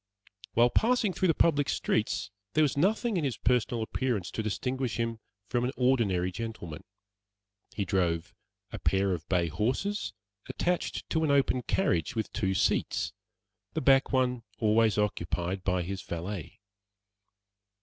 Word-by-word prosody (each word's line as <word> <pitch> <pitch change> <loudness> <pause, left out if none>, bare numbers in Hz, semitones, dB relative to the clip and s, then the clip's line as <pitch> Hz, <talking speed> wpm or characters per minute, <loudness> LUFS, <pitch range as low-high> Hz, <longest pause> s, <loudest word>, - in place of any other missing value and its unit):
While 120 +1 +5
passing 225 - +2
through 185 - +1
the 165 - +3
public 145 -4 +3
streets, 110 -1 0 0.2
there 155 - +4
was 145 - +1
nothing 210 - +2
in 165 - 0
his 135 -5 -1
personal 120 -2 +1
appearance 115 -5 -2
to - - -2
distinguish 125 +2 -2
him 115 -1 -1 0.3
from 120 -1 0
any 125 +2 -1
ordinary 110 -9 +2
gentlemen. 95 -6 -6 0.9
He 100 -1 -1
drove 85 -3 0 0.4
a - - -5
pair 95 0 +2
of 80 -4 -6
bay 90 -3 +2
horses, 130 - -1 0.4
attached 180 0 -1
to 160 -1 +2
an 155 - +1
open 140 -2 +3
carriage 115 - 0
with 110 - -3
two 95 -4 0
seats, - - +1 0.6
the - - -1
back 135 0 +4
one 125 -2 +1 0.2
always 110 -1 +3
occupied 95 -2 -1
by 90 -2 +1
his 95 +2 -4
valet. 85 +2 -6
115 Hz, 145 wpm, -29 LUFS, 95-135 Hz, 0.9 s, While